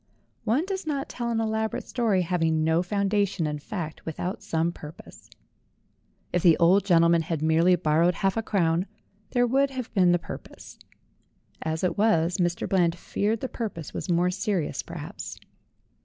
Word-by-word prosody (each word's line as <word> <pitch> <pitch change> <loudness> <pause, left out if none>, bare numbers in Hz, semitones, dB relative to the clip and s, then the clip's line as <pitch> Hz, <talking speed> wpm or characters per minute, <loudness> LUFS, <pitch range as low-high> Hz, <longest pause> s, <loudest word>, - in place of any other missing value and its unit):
One 245 +10 +2
does 380 -3 -4
not 280 -3 -2
tell 240 -1 -3
an 230 -1 0
elaborate 220 0 -1
story 220 -7 +1
having 165 -2 +1
no 160 +2 +3
foundation 200 -1 0
in 150 -1 -2
fact 160 -1 -6
without 175 +4 -4
some 165 +1 0
purpose. 150 -2 -12 1.0
If 180 - +2
the 165 -2 +5
old 180 +4 +5
gentleman 170 -2 +4
had 160 -1 -3
merely 165 +3 +4
borrowed 165 +1 +2
half 195 +1 0
a 225 - 0
crown, 180 -4 +1 0.4
there 245 -1 +2
would 270 +3 +2
have 255 -3 -6
been 185 -4 +4
the 175 - +4
purpose; 170 - -10 0.8
as 160 +1 -2
it 185 +2 0
was, 180 -6 +3
Mr. 175 -1 0
Bland 175 -3 +2
feared 210 +5 -1
the 260 - -2
purpose 205 - -5
was - - -5
more 175 +1 +2
serious, 195 -3 -1
perhaps. - - -8
180 Hz, 160 wpm, -26 LUFS, 165-220 Hz, 1.0 s, the